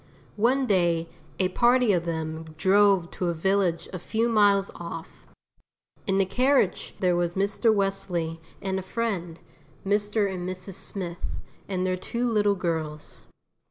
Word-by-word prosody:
One 260 +4 +3
day 175 -6 +2 0.3
a 185 -1 +1
party 240 +2 +4
of 170 -2 0
them 160 -1 -4
drove 195 0 +4
to 180 - -2
a 170 - 0
village 185 0 +1
a 185 - -4
few 225 +6 0
miles 205 -3 +4
off. 165 -1 -9 0.8
In 195 -1 +2
the 195 - +4
carriage 255 0 +1
there 180 -2 +2
was 175 0 0
Mr. 200 +4 +2
Wesley 180 -5 -1 0.2
and 190 -1 -1
a - - -4
friend, 185 -5 -3 0.5
Mr. 205 +1 +1
and 185 -2 -4
Mrs. 185 +1 -6
Smith 185 -2 -5 0.4
and 185 -1 -1
their 185 0 0
two 235 +6 -2
little 205 -3 +2
girls. 160 -4 -4
190 Hz, 145 wpm, -26 LUFS, 170-205 Hz, 0.8 s, party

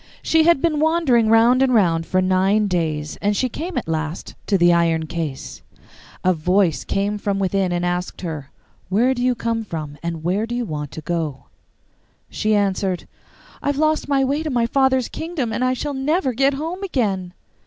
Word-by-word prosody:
She 320 -1 +3
had 340 -5 +4
been 315 -3 +2
wandering 305 -8 +3
round 230 +3 +5
and 260 -2 +3
round 165 -6 +2
for 185 0 +1
nine 190 +3 +2
days, 160 -5 -2
and 205 0 0
she 255 - +1
came 340 +9 -5
at - - -2
last 160 +1 -3
to 200 - +3
the 175 -1 +5
iron 165 -1 +2
case. 160 -5 -5 0.6
A 185 - +4
voice 180 +1 +1
came 205 +1 -1
from 200 -1 -1
within 195 -1 0
and 175 0 -1
asked 175 +1 -3
her, 155 -6 -5 0.4
'Where 235 +7 +3
do 245 - -4
you 250 0 +2
come 230 -1 -2
from, 155 -7 -6
and 170 -2 -4
where 195 +6 0
do 240 - -4
you 245 -1 -2
want 150 -5 -4
to 160 - -7
go?' 155 -4 -3 0.9
She 215 0 +1
answered, 195 -2 0 0.5
'I - - -4
have 285 -1 +1
lost 310 +1 +1
my 275 -1 +2
way 280 +3 0
to 315 - -3
my 240 -4 +1
father's 260 0 +2
kingdom, 315 -9 -4
and 250 - -1
I 255 0 +2
shall 290 +3 -3
never 275 +1 0
get 270 +3 +2
home 330 +6 -4
again. 200 - -2
210 Hz, 195 wpm, -21 LUFS, 175-265 Hz, 0.9 s, round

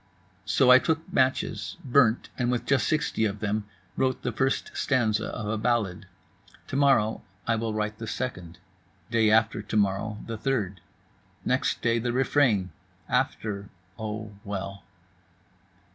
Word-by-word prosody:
So 125 - +4
I 130 - +9
took 160 +3 -2
matches, 130 0 0
burnt, 125 -3 +3
and 125 -2 0
with 120 -1 -1
just 135 -5 +2
60 155 -7 0
of 105 -1 -2
them 105 0 -1 0.3
wrote 130 -1 0
the - - -1
first 135 0 0
stanza 110 -5 +1
of 110 - -5
a 110 +1 -1
ballade. 105 -4 0 0.6
To - - -4
morrow 135 -6 +3 0.2
I 115 - +2
will 110 -1 -2
write 105 0 -2
the 115 - -5
second. 90 -8 -4 0.5
Day 115 -2 +4
after 110 0 +3
to 110 +1 -3
morrow 100 +1 +1
the 115 -1 -5
third. 105 -10 -1 0.6
Next - - 0
day 115 0 +2
the 120 +1 -1
refrain. 125 -7 +2 0.4
After—oh, 105 +1 -3
well. 100 -1 -5
110 Hz, 140 wpm, -27 LUFS, 105-125 Hz, 0.6 s, I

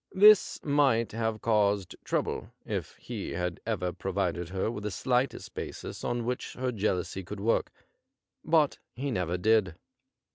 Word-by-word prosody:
This 210 +1 +7
might 140 -6 +3
have 110 -1 -2
Caused 105 -4 +2
trouble - - -1 0.2
if - - -3
he - - -5
had 90 0 -2
ever 90 -6 -1
provided 90 -2 -2
her 95 +4 -1
with 105 -3 -6
the 105 - -1
slightest 125 +7 0
basis - - -6
on 120 -1 -1
which 125 +1 -3
her 130 0 -1
jealousy 95 -3 -1
could 100 +3 -7
work, 115 +3 +1 0.7
but 155 -3 +3 0.2
he 135 +2 -2
never 90 -4 0
did. 100 -2 +3
110 Hz, 145 wpm, -29 LUFS, 95-125 Hz, 0.7 s, This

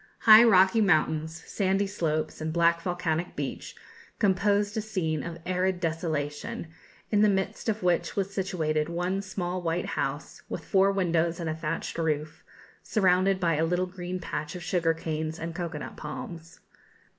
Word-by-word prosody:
High 220 0 +9
rocky 195 -1 +5
mountains, 160 -3 +1
sandy 195 0 0
slopes, 160 -6 -2
and 155 0 -2
black 170 0 +3
volcanic 175 -1 -2
beach, - - -5 0.4
composed 205 0 +2
a 220 - 0
scene 170 -8 -2
of 170 0 -6
arid 185 0 0
desolation, 160 -2 -3 0.4
in 210 -1 +4
the 210 - +5
midst 190 +3 -1
of 215 -2 -2
which 175 -1 +1
was 195 0 -1
situated 160 -5 -1
one 180 +3 -1
small 185 -1 -3
white 170 +1 -1
house, - - -3
with - - -5
four 195 0 +4
windows 170 -3 +1
and 165 -2 -2
a - - -1
thatched 160 +1 -4
roof, 155 -1 -2 0.4
surrounded 185 -2 +2
by 165 -4 +1
a 160 - +2
little 180 +2 +1
green 180 0 -5
patch 155 -2 -4
of 180 - -6
sugar 165 -2 +1
canes 160 0 -3
and 165 0 -5
cocoa 170 -2 -4
nut - - -8
palms. 165 +2 -8
175 Hz, 160 wpm, -27 LUFS, 160-190 Hz, 0.4 s, High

